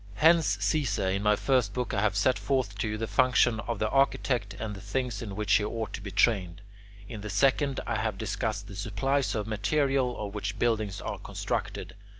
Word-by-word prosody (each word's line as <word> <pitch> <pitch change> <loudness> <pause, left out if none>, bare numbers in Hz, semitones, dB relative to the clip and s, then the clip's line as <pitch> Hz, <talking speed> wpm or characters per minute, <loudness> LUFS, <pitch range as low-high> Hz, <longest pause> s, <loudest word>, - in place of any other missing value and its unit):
Hence, 160 -6 +4
Caesar, 105 -3 +1
in 100 +1 -1
my 105 0 +4
first 125 -4 +1
book 125 -1 -2
I 100 - +1
have 105 -2 +1
set 125 +6 +2
forth 130 -8 -1
to 110 - 0
you 105 0 -2
the 115 - -2
function 120 +2 +3
of 115 +1 -3
the 110 - 0
architect 125 -5 +1
and 110 -1 -5
the 95 - -9
things 120 +2 -2
in 100 -4 -6
which 105 -1 0
he 105 - +4
ought 110 +1 -3
to - - -5
be 100 - -6
trained. 95 -3 +1 0.4
In 110 -3 -7
the 105 - -6
second 135 +6 +2
I 115 - -1
have 110 -2 -2
discussed 105 0 -3
the 100 - -9
supplies 115 +7 0
of 105 -1 -1
material 130 +4 0
of 105 -1 -5
which 105 - -4
buildings 110 -4 0
are - - -4
constructed. - - -4
110 Hz, 205 wpm, -28 LUFS, 100-125 Hz, 0.4 s, Hence